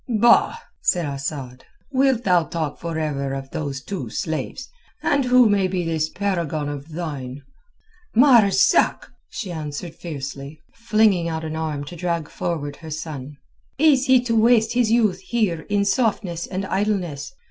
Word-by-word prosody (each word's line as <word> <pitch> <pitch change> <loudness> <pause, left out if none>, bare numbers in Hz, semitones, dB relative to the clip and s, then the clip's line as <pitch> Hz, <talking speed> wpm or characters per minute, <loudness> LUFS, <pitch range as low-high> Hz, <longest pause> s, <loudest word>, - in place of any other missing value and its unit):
"Bah!" 235 - +4 0.2
said 175 -2 +1
Asad. 140 -2 -5 0.3
"Wilt 265 -3 +2
thou 180 -4 +3
talk 160 -4 -4
forever 155 -5 -2
of 135 0 -7
those 140 -3 -4
two 175 - -5
slaves? 160 - -4 0.4
And 280 -2 +2
who 250 -1 +6
may 200 -2 +2
be 180 -1 -2
this 160 -1 0
paragon 170 -7 -2
of 145 +1 -7
thine?" 145 -5 -5 0.7
"Marzak," 235 -6 +4 0.2
she 195 -6 -5
answered 155 +1 -5
fiercely, 140 -2 -7
flinging 215 -6 +2
out 160 0 -3
an 155 0 -4
arm 155 -3 -3
to 160 +5 -9
drag 170 -2 -2
forward 145 -4 -4
her 160 - -10
son. 150 -2 -6 0.4
"Is 275 -3 +4
he 260 -1 +6
to 240 -2 -1
waste 225 0 +4
his 245 -2 +2
youth 220 -5 +2
here 190 -5 -1
in 205 0 +2
softness 195 -5 0
and 190 +1 -3
idleness? 190 - -2
170 Hz, 145 wpm, -22 LUFS, 150-215 Hz, 0.7 s, who